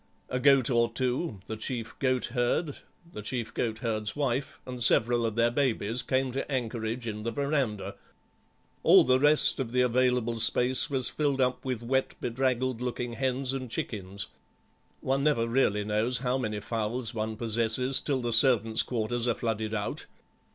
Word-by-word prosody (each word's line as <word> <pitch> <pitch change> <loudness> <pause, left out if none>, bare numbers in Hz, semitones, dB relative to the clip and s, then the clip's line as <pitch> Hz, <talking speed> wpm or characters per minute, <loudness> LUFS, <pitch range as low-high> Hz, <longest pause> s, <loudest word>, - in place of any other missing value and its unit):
A 125 - -1
goat 135 -1 +4
or 120 -1 +3
two, 125 - -2
the 110 - -5
chief 115 +1 -4
goat 130 -2 +1
herd, 135 +4 0 0.4
the 105 - -6
chief 115 +1 -4
goat 110 -2 -2
herd's 110 -2 -1
wife, 135 -2 -2
and 125 -1 -7
several 120 0 +3
of 110 - -4
their 115 0 +3
babies 120 -3 0
came 130 0 0
to 135 +3 -4
anchorage 115 -2 -2
in 105 -2 -4
the 115 - -2
verandah. 135 -5 -1 0.9
All - - +7
the 130 0 +3
rest 150 +1 +5
of 125 -4 -3
the 125 0 +2
available 125 -1 +1
space 125 +3 +2
was 130 -4 0
filled 140 -1 -1
up 125 -1 +1
with 125 -3 -3
wet, 130 +2 0
bedraggled 130 0 -1
looking 125 -1 -3
hens 130 +2 0
and 130 -2 -4
chickens; 100 -3 -3 0.7
one 135 +1 0
never 140 -6 +2
really 115 -4 +1
knows 110 +4 0
how 125 0 -1
many 105 -4 -3
fowls 115 +2 -2
one 110 -1 -3
possesses 115 +3 0
till 135 -3 -1
the 120 -1 -1
servants' 115 -2 +3
quarters 120 0 -2
are 120 - +1
flooded 110 -2 -2
out. 105 -1 -4
120 Hz, 165 wpm, -28 LUFS, 115-130 Hz, 0.9 s, All